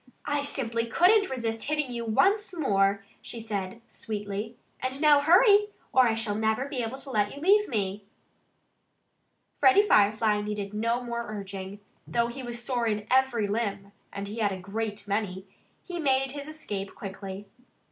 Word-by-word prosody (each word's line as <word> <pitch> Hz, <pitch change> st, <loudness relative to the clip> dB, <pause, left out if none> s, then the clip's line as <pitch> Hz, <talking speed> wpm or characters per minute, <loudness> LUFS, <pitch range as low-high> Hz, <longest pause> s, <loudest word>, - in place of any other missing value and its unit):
"I 290 Hz, 0 st, 0 dB
simply 235 Hz, -5 st, -1 dB
couldn't 390 Hz, -, +4 dB
resist 225 Hz, -3 st, -2 dB
hitting 300 Hz, -3 st, -1 dB
you 235 Hz, -1 st, -4 dB
once 390 Hz, -, +2 dB
more!" 200 Hz, -7 st, +2 dB, 0.2 s
she 235 Hz, -, -6 dB
said 210 Hz, 0 st, -5 dB
sweetly. 210 Hz, +1 st, -5 dB, 0.2 s
"And 260 Hz, +1 st, -3 dB
now, 300 Hz, -1 st, +6 dB
hurry! 405 Hz, +7 st, +6 dB, 0.3 s
Or 255 Hz, -1 st, +6 dB
I 225 Hz, -, +1 dB
shall 225 Hz, -2 st, 0 dB
never 220 Hz, +4 st, 0 dB
be 275 Hz, -3 st, -3 dB
able 230 Hz, +3 st, -4 dB
to 270 Hz, 0 st, -5 dB
let 205 Hz, -1 st, 0 dB
you -, -, -8 dB
leave 410 Hz, +6 st, +4 dB
me." 200 Hz, -3 st, -2 dB, 1.5 s
Freddie 390 Hz, +1 st, +6 dB
Firefly 210 Hz, -, +4 dB
needed 205 Hz, -1 st, -4 dB
no 230 Hz, +3 st, 0 dB
more 235 Hz, -1 st, -4 dB
urging. 200 Hz, -1 st, -7 dB, 0.3 s
Though 235 Hz, 0 st, +1 dB
he 245 Hz, +3 st, -7 dB
was 240 Hz, -1 st, -5 dB
sore 240 Hz, -1 st, -1 dB
in 210 Hz, -1 st, -1 dB
every 255 Hz, -5 st, +3 dB
limb 200 Hz, -2 st, -2 dB, 0.2 s
(and 200 Hz, 0 st, -5 dB
he 215 Hz, +3 st, -6 dB
had 205 Hz, -2 st, +2 dB
a 190 Hz, -, -4 dB
great 205 Hz, +2 st, -5 dB
many!) 200 Hz, -2 st, -2 dB, 0.4 s
he 350 Hz, -2 st, -6 dB
made 270 Hz, -3 st, +2 dB
his 285 Hz, +1 st, -7 dB
escape 205 Hz, -11 st, -6 dB
quickly. 195 Hz, 0 st, -7 dB
225 Hz, 165 wpm, -27 LUFS, 205-270 Hz, 1.5 s, now